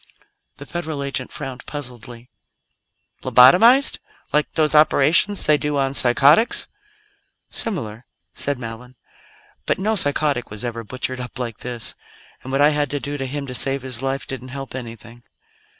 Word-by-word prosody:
The - - -9
Federal 160 -5 -4
agent 135 -2 -4
frowned 130 -1 -8
puzzledly. 125 -4 -8 0.9
"Lobotomized? 225 - +6 0.3
Like 150 0 +1
those 155 -2 +2
operations 155 +6 +4
they 150 -1 +4
do 150 -1 -2
on 135 -1 0
psychotics?" 140 - +4 0.8
"Similar," 120 - 0 0.3
said 145 -1 -2
Mallon. 125 +1 -9 0.7
"But - - +1
no 215 +4 0
psychotic 145 - 0
was 105 +4 -6
ever 115 -1 -4
butchered 130 +3 -4
up 125 +1 -7
like 120 -4 -5
this; 120 -2 -6 0.5
and 130 - -8
what 135 +1 +1
I 145 - +6
had 145 -2 0
to 145 - -3
do 145 +1 -5
to 135 - -3
him 140 +1 -4
to 130 - -7
save 135 +1 0
his 130 -2 -3
life 135 0 -2
didn't 130 -1 -7
help 135 +1 -7
anything." 120 -1 -9
135 Hz, 150 wpm, -21 LUFS, 125-150 Hz, 0.9 s, Lobotomized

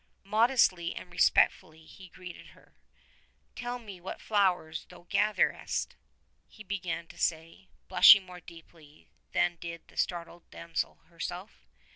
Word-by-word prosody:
Modestly 210 -5 +2
and - - -9
respectfully 160 0 +2
he 185 +2 -14
greeted 180 0 -11
her. - - -21 0.8
'Tell 245 0 -4
me 205 -7 -11
what 185 - -7
flowers 180 -6 0
thou 175 -1 -15
gatherest?" 210 +3 0 0.5
he 215 - -14
began 185 -4 -4
to - - -15
say, 165 +3 -2 0.2
blushing 190 +1 +8
more 180 -1 -11
deeply 165 -3 -16 0.2
than 175 -1 +1
did 170 -1 -8
the - - -19
startled 175 -1 -3
damsel 170 0 -4
herself. 175 +4 -8
180 Hz, 125 wpm, -30 LUFS, 170-200 Hz, 0.8 s, blushing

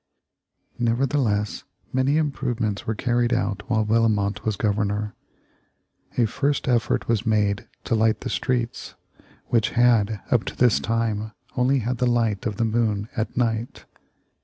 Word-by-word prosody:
Nevertheless 120 -3 0 0.3
many 130 +3 +2
improvements 125 -8 -1
were 110 - 0
carried 120 +1 +1
out 100 0 0
while 110 -2 +2
Bellomont 105 -2 +1
was 110 -2 0
Governor. 105 0 -1 1.0
A 120 - +4
first 140 +6 -1
effort 120 -3 +1
was 115 -2 +1
made 105 -3 +1 0.2
to - - -2
light 110 -1 +2
the - - -4
streets, 120 -2 -2 0.5
which 115 -2 +2
had, 115 -4 +4
up 120 -3 +3
to - - -5
this 120 -3 +4
time, 110 -1 -1 0.2
only 130 +2 +3
had 125 0 -1
the 125 - +2
light 115 -5 +1
of 105 -2 -4
the 115 - +1
moon 110 -2 0
at 110 +1 -3
night. 115 -1 -1
115 Hz, 140 wpm, -24 LUFS, 105-120 Hz, 1.0 s, A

